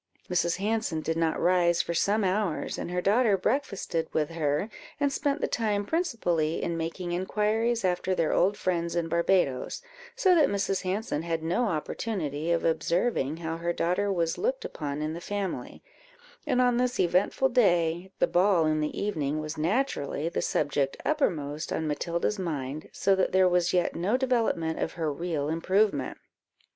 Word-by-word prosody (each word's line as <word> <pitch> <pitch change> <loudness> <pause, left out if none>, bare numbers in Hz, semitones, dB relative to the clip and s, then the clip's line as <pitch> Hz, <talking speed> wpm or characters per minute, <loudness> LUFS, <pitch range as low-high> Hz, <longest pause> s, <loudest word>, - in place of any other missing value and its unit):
Mrs. 175 -1 +1
Hanson 205 -5 -1
did 160 +1 -1
not 165 -1 0
rise 175 -1 +3
for 170 - -3
some 205 +5 +2
hours, 190 -2 -1
and - - -4
her 180 0 -1
daughter 210 +1 +3
breakfasted 195 - -1
with 155 0 0
her, 150 +2 0 0.3
and 285 -1 +1
spent 285 +1 -1
the - - +1
time 210 -3 0
principally 200 - 0
in 170 - -1
making 165 +2 -4
inquiries 210 +5 0
after 185 +1 0
their 165 -3 +1
old 200 +3 +2
friends 170 -2 -1
in 170 -1 0
Barbadoes, 170 - +1 0.3
so 390 -7 +4
that 320 -4 +5
Mrs. 195 -1 0
Hanson 190 -4 -2
had 165 -1 -2
no 175 +9 +1
opportunity 160 -3 -2
of 170 - +1
observing 165 - 0
how 165 -1 -4
her 170 +1 -1
daughter 185 +5 0
was 170 -3 0
looked - - -1
upon 150 - -4
in 155 +1 -2
the 170 - -6
family, 195 -10 -4 0.6
and 255 -4 +2
on 245 -1 +3
this 250 0 0
eventful 185 +9 +2
day, 175 -7 +2
the - - +4
ball 180 -2 +3
in 155 0 +1
the 150 - -2
evening 155 -7 -1
was 155 +1 -4
naturally 165 - -1
the - - -2
subject 140 -2 0
uppermost 155 - -1
on 160 - -1
Matilda's 170 +6 -1
mind, 150 -4 -4
so 195 - +2
that 190 -1 +1
there 185 0 +5
was 180 -1 +2
yet 180 -1 +1
no 190 +9 +1
development 230 -11 0
of - - -2
her 160 -3 -2
real 160 -2 -2
improvement. 165 -1 +1
175 Hz, 170 wpm, -28 LUFS, 160-210 Hz, 0.6 s, that